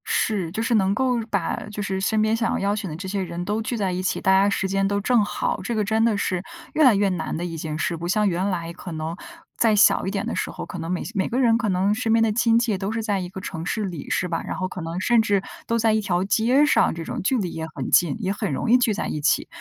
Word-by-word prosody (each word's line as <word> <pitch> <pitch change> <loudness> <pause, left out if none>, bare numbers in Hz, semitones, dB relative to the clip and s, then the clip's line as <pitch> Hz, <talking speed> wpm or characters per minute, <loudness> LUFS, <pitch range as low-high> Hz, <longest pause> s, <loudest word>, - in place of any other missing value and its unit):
是， 190 -7 0
就 220 +5 -2
是 230 - 0
能 195 -2 +3
够 255 -2 +1
把 200 -5 0 0.2
就 210 - -5
是 190 -1 -2
身 215 +2 +1
边 215 +1 +2
想 230 0 0
要 - - -1
邀 200 +1 0
请 200 -3 -4
的 155 - -6
这 185 +4 -6
些 195 +1 -2
人 175 0 -5
都 210 +3 -1
聚 235 +2 -3
在 195 -3 0
一 180 +1 -2
起， 185 - -1
大 190 - +3
家 195 +1 +5
时 195 -1 -1
间 195 +1 +1
都 200 0 0
正 235 +1 +3
好， 205 - -2
这 235 - -2
个 215 - +1
真 220 +2 +1
的 225 -3 +2
是 185 -2 -1 0.3
越 310 - +3
来 255 -6 +7
越 200 0 +2
难 180 -3 -3
的 175 - -3
一 165 -2 -5
件 155 -1 -4
事， 170 - -1
不 170 +1 -5
像 210 +3 +2
原 185 +2 0
来 170 -3 -3
可 175 +1 -9
能 160 +1 -4 0.4
在 225 -2 +3
小 205 -2 +4
一 - - -1
点 195 -1 -2
的 - - -3
时 - - -2
候， - - -7
可 180 - -7
能 165 +1 -4
每 180 - -2
些 - - -7
每 195 -3 0
个 245 - -1
人 230 -3 +4
可 230 -3 -1
能 190 +2 +2
身 225 0 0
边 225 0 +4
的 225 - +2
亲 230 +1 +3
戚 230 -4 +1
都 195 +2 -3
是 225 0 -2
在 205 -2 0
一 180 -1 -5
个 190 - -8
城 165 -2 -6
市 215 +3 -1
里， 175 -6 -6
是 180 - 0
吧？ 170 - -2
然 - - -4
后 185 - -1
可 185 - -7
能 165 +2 -4
甚 235 +4 +3
至 200 -3 +1 0.2
都 230 - +1
在 225 -1 +3
一 215 - +2
条 185 -3 0
街 235 +8 +3
上 295 - +3
这 165 - -5
种， - - -4
距 250 +8 +1
离 185 -6 -2
也 160 0 -5
很 135 - -4
近， 175 -3 +4
也 195 -3 -1
很 200 - -3
容 180 - -1
易 250 - +8
聚 240 -3 +2
在 205 - -3
一 150 - -3
起。 150 - +2
200 Hz, 325 characters per minute, -23 LUFS, 180-220 Hz, 0.4 s, 易